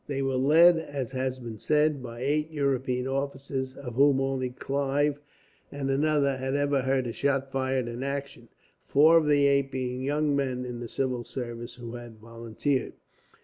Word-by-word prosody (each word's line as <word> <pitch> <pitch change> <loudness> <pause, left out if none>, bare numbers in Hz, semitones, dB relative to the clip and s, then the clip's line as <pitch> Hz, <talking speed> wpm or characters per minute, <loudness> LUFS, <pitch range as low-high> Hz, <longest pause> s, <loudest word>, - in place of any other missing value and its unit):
They 135 -1 -2
were 135 0 0
led, 160 +7 +6
as 140 -5 -5
has 130 -1 -2
been 115 -4 -8
said, 150 0 +2
by 120 -1 -8
eight 150 +3 0
European 135 -4 -1
officers, 135 -1 -3
of 125 -4 -7
whom 140 +2 +4
only 135 -1 -1
Clive 140 +3 -1 0.5
and 135 -1 -2
another 140 -1 +2
had 130 +1 -2
ever 145 -1 +1
heard 130 0 0
a 115 - -4
shot 135 0 0
fired 130 -2 -1
in 120 +1 -5
action, 140 -3 -5 0.4
four 155 +4 +6
of 155 - -2
the 145 -1 +4
eight 140 -1 +3
being 130 -1 -3
young 145 +2 +1
men 130 -2 -1
in 120 -1 -6
the 120 -1 -6
civil 130 -3 -2
service, 120 -1 -6
who 120 -1 -8
had 120 -2 -9
volunteered. 115 +4 -3
135 Hz, 175 wpm, -27 LUFS, 125-140 Hz, 0.5 s, led